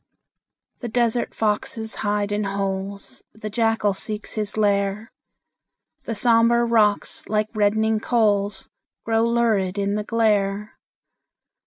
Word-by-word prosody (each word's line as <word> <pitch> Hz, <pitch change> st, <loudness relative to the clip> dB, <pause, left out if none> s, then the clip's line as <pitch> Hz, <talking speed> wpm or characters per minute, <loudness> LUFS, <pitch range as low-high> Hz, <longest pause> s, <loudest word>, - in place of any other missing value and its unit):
The 240 Hz, -, -5 dB
desert 235 Hz, 0 st, 0 dB
foxes 220 Hz, +1 st, -1 dB
hide 205 Hz, 0 st, -1 dB
in 205 Hz, 0 st, -1 dB
holes, 195 Hz, 0 st, -4 dB
The 215 Hz, 0 st, -7 dB
jackal 225 Hz, -2 st, +1 dB
seeks 210 Hz, +2 st, -5 dB
his 210 Hz, -1 st, -3 dB
lair; 200 Hz, +1 st, 0 dB, 0.9 s
The 230 Hz, -, -3 dB
sombre 235 Hz, +1 st, +4 dB
rocks, 215 Hz, -3 st, +1 dB
like 215 Hz, 0 st, 0 dB
reddening 220 Hz, +1 st, +2 dB
coals, 205 Hz, -4 st, 0 dB, 0.4 s
Glow 225 Hz, 0 st, +2 dB
lurid 220 Hz, -5 st, +1 dB
in 200 Hz, 0 st, 0 dB
the 210 Hz, 0 st, -1 dB
glare. 210 Hz, -2 st, 0 dB
215 Hz, 115 wpm, -23 LUFS, 200-225 Hz, 0.9 s, sombre